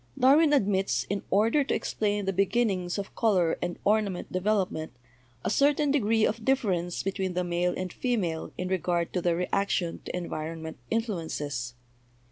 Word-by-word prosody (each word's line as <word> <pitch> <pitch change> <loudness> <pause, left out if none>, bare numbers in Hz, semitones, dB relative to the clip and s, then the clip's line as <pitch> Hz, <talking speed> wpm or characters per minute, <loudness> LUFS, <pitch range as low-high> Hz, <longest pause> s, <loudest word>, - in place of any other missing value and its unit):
"Darwin 290 +4 +5
admits, 195 -8 +2
in 200 - -1
order 225 +9 +3
to 275 - -1
explain 205 -1 -1
the 195 - 0
beginnings 195 -2 +1
of 200 -1 -5
color 185 -8 +2
and 175 - -3
ornament 205 -3 +1
development, 185 -4 0 0.5
a - - +2
certain 285 +3 +3
degree 225 -5 +3
of 220 +1 -2
difference 190 -10 0
between 190 -2 -2
the 180 - +1
male 175 0 0
and 185 -2 -4
female 195 -11 -1
in 180 - -2
regard 175 -2 0
to 180 - 0
their 170 -1 +2
reaction 180 -1 -1
to - - -5
environment 160 -2 -5
influences. 155 - -2
190 Hz, 150 wpm, -28 LUFS, 175-220 Hz, 0.5 s, Darwin